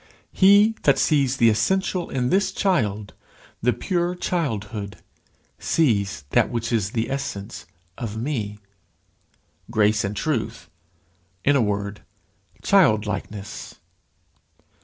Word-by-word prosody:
"He 200 +3 +5
that 140 - +4
sees 140 -4 +2
the 115 -2 +5
essential 180 - 0
in 125 -1 -1
this 190 +3 +2
child, 110 - 0 0.5
the 125 - +3
pure 175 +4 -1
childhood, 110 - -3 0.6
sees 100 - +1
that - - +3
which 115 0 -3
is 105 -2 0
the 115 -1 -1
essence 100 -7 -5 0.3
of 110 -2 -5
me," 110 -5 -3 1.1
grace 110 -2 +2
and 100 +1 -3
truth 110 - -3 0.7
in 145 - +4
a 140 - +4
word, 100 -1 -2 0.6
childlikeness. 105 - 0
115 Hz, 105 wpm, -23 LUFS, 105-160 Hz, 1.1 s, He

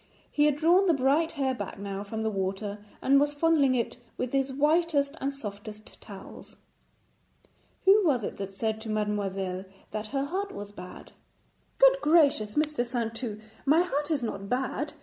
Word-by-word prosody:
He 295 - +3
had 300 -2 +3
drawn 350 +5 +4
the 335 - +4
bright 280 +5 +2
hair 270 -4 0
back 205 -6 -6
now 200 0 -5
from 220 +2 -4
the 220 - 0
water, 200 +1 -3 0.2
and 275 +1 +5
was 290 +1 +2
fondling 290 -3 +3
it 235 -1 -1 0.2
with 255 0 -3
his 270 0 +1
whitest 295 0 +2
and 275 - 0
softest 215 -4 -9
towels. 200 -3 -11 1.3
'Who 400 +2 +7
was 270 - +2
it - - -4
that 195 -1 -6
said 220 +1 -2
to 220 - -7
mademoiselle 195 -3 -2 0.3
that 215 0 -4
her 275 +3 -1
heart 390 +6 -3
was 205 - -7
bad?' 180 -2 -11 0.7
'Good - - +6
gracious, 285 -10 +3
Mr. 300 -4 +1
Saintou, 230 -2 -3 0.2
my 310 +5 +4
heart 295 -4 -1
is 295 -6 0
not 200 -3 -4
bad. 265 +4 -2
260 Hz, 170 wpm, -28 LUFS, 210-295 Hz, 1.3 s, Who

